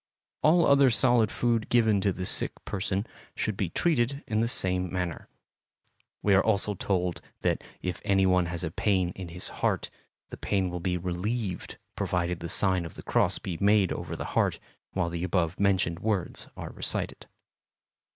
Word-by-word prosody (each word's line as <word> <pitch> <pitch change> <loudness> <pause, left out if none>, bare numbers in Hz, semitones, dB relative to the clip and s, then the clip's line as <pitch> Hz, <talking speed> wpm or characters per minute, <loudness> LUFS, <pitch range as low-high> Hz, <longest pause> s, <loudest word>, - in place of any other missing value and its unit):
All 165 +2 +5
other 140 -1 +6
solid 120 -2 +4
food 115 -2 0
given 110 -4 +3
to 100 0 +2
the 90 0 -4
sick - - +3
person 95 +1 -2 0.3
should 110 - -1
be 95 -3 -1
treated 140 - 0
in 110 0 -1
the 115 - +2
same 90 -5 0
manner. 90 -3 -3 1.0
We 100 - +4
are 95 - +5
also 105 -1 +2
told 90 -2 -1 0.2
that - - 0 0.2
if 90 -1 -3
any 95 -2 +3
one 90 -2 +3
has 85 +1 -4
a 80 - -2
pain 95 -1 +1
in 90 0 -7
his 85 +1 -6
heart, - - 0 0.4
the - - -8
pain 95 -3 0
will 90 - -4
be 90 0 -1
relieved 95 +3 -3 0.2
provided 90 -1 -1
the 85 -1 -5
sign 95 -1 +2
of 85 - -8
the - - -8
cross - - +2
be 85 -3 -5
made 100 -2 +4
over - - -5
the - - -5
heart - - +1 0.3
while 95 -3 0
the 85 0 -3
above 90 -2 0
mentioned 95 -4 +2
words 105 -4 -2
are - - -6
recited. - - 0
95 Hz, 175 wpm, -28 LUFS, 90-110 Hz, 1.0 s, other